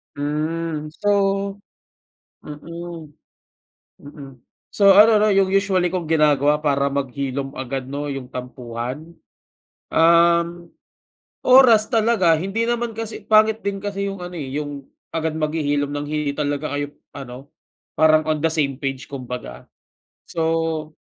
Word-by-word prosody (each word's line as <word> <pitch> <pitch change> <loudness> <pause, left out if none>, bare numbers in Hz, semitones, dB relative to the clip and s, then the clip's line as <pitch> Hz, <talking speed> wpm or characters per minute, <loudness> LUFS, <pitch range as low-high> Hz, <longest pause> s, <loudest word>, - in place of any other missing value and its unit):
Mm. 155 +2 -3 0.2
So 205 - +2 1.4
mm, 165 +2 -8 0.9
mm. 140 -1 -12 0.4
So, 200 -1 +5
ano 215 +3 +7
'no, 210 0 +3
yung 195 -1 +3
usually 190 -2 +2
kong 180 -1 -3
ginagawa 150 -2 +2
para 140 -2 +1
maghilom 135 0 -3
agad 130 0 -4
'no, 145 +2 -4
yung 135 -2 -7
tampuhan, 125 +5 -7 0.7
um, 170 +1 +3 0.7
oras 250 -4 +7
talaga. 220 -6 +3
Hindi 195 +6 -1
naman 235 -1 -2
kasi 225 -1 -5
pangit 220 0 +3
din 200 0 -3
kasi 200 -1 -2
yung 195 -2 -6
ano, 180 - -8
eh, 135 - -5
yung 145 -2 -5 0.2
agad 160 -1 -2
maghihilom 145 -2 -1
ng 145 0 -4
hindi 150 -1 -1
talaga 145 0 -3
kayo 145 0 -4 0.2
ano, 135 0 -10 0.4
parang 155 0 +4
on 155 -1 -1
the 165 - +2
same 145 -4 -1
page, 135 -1 -3
kumbaga. 125 - -7 0.6
So, 160 -1 -1
155 Hz, 125 wpm, -21 LUFS, 140-180 Hz, 1.4 s, ano